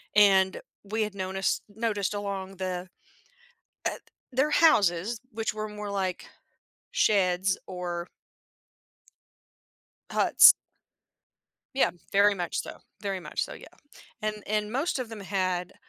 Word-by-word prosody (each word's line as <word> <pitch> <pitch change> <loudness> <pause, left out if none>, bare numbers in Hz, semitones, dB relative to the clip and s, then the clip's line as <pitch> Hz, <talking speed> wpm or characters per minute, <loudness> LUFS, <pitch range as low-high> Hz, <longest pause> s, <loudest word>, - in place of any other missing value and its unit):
and 195 -2 +5 0.2
we 220 +2 -2
had 210 -1 -4
noticed 190 0 -1
noticed 210 -2 -1
along 195 -2 -4
the 185 -1 -3 1.0
uh - - -7 0.3
their 265 +4 +2
houses, 210 - +4
which 225 0 -2
were 215 0 -4
more 210 -1 -6
like 190 -2 -2 0.6
sheds 190 -2 +2
or 175 -1 -4 2.0
huts. - - +7 1.2
Yeah, 270 - +3 0.2
very 205 +1 +5
much 175 -3 -2
so, - - -6 0.2
very 195 -2 -2
much 175 - -2
so, - - -9
yeah - - -11 0.5
and 215 0 -1
and 210 0 -1
most 275 +4 0
of 250 -3 -4
them 225 -2 -8
had 185 -2 -1
200 Hz, 115 wpm, -28 LUFS, 185-215 Hz, 2.0 s, huts